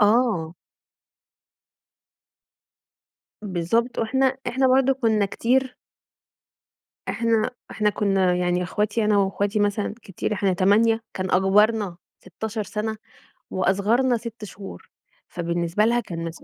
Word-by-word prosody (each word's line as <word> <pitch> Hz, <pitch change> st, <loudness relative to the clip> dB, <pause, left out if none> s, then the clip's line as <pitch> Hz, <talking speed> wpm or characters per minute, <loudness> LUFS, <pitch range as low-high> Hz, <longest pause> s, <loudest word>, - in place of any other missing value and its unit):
آه. 205 Hz, -7 st, +2 dB, 3.0 s
بالضبط 190 Hz, +8 st, 0 dB
وإحنا 265 Hz, +3 st, +1 dB
إحنا 265 Hz, +2 st, +1 dB
برضو 265 Hz, +1 st, +4 dB
كنا 220 Hz, -6 st, +1 dB
كتير 255 Hz, +5 st, 0 dB, 1.3 s
إحنا 230 Hz, 0 st, +1 dB, 0.2 s
إحنا 210 Hz, -1 st, +1 dB
كنا 195 Hz, -3 st, +1 dB
يعني 180 Hz, 0 st, 0 dB
أخواتي 210 Hz, +4 st, -1 dB
أنا 210 Hz, -1 st, +3 dB
وأخواتي 200 Hz, +2 st, 0 dB
مثلًا 205 Hz, 0 st, 0 dB
كتير. 195 Hz, +2 st, -4 dB
إحنا 200 Hz, -2 st, +1 dB
8 210 Hz, +5 st, +3 dB
كان 185 Hz, -1 st, -3 dB
أكبرنا 200 Hz, 0 st, +3 dB, 0.2 s
16 215 Hz, +4 st, -5 dB
سنة، 220 Hz, +2 st, -4 dB, 0.6 s
وأصغرنا 215 Hz, +7 st, +2 dB
6 230 Hz, -1 st, -9 dB
شهور. 195 Hz, 0 st, -11 dB, 0.4 s
فبالنسبة 170 Hz, +3 st, -1 dB
لها 240 Hz, +1 st, +2 dB
كان 170 Hz, -7 st, -6 dB
مس 165 Hz, 0 st, -8 dB
210 Hz, 105 wpm, -23 LUFS, 190-230 Hz, 3.0 s, برضو